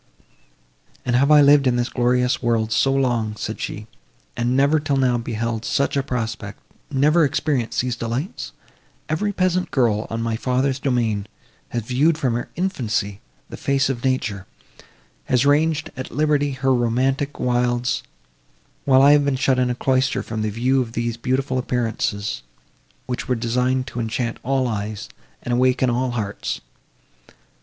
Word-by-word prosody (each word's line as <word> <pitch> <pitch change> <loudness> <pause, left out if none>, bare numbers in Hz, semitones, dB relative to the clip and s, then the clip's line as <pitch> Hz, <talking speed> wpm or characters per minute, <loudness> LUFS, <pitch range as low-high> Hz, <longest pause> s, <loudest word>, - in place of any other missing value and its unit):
"And 120 -1 +1
have 140 +3 +3
I 150 -1 +7
lived 140 -1 +6
in 125 - +2
this 120 0 0
glorious 125 +1 +1
world 115 -2 0
so 135 +4 +3
long," 120 -5 0
said - - -5
she, - - -5 0.5
"and 120 +2 0
never 140 +3 +4
till 145 -2 -1
now 125 -2 +2
beheld 115 -1 -3
such 140 +5 0
a 140 - +2
prospect—never 130 +6 -1
experienced 145 -4 0
these 125 -1 -2
delights! 120 +9 -4 0.6
Every 185 +7 0
peasant 185 -1 0
girl, 115 -5 +1
on 115 - -3
my 115 -1 -1
father's 130 +2 0
domain, 115 -7 0 0.4
has 120 -2 -3
viewed 140 +8 +2
from 130 -7 0
her 120 +1 -3
infancy 110 - -2 0.3
the - - -7
face 135 -1 +1
of 120 -3 -3
nature; 105 -7 -1 0.8
has 125 +1 +2
ranged, 150 +1 +2
at 130 +1 -6
liberty, 145 -2 +1
her 130 0 +1
romantic 130 +4 0
wilds, 120 0 0 0.8
while 135 -1 +5
I 140 - +8
have 145 0 +5
been 140 -1 +1
shut 130 0 +2
in 125 -1 +2
a 125 - -1
cloister 130 +1 +1
from 110 -1 -4
the 110 - 0
view 125 +5 +1
of 115 -2 -5
these 120 0 -2
beautiful 130 +2 -1
appearances, 115 -4 -2 0.6
which 125 - -4
were 125 - +1
designed 125 +2 0
to 125 -2 -6
enchant 115 +1 -2
all 130 -1 0
eyes, 105 -2 -4 0.3
and 120 - -2
awaken 130 0 +2
all 125 +2 0
hearts. 110 -4 -3
125 Hz, 155 wpm, -22 LUFS, 115-135 Hz, 0.8 s, I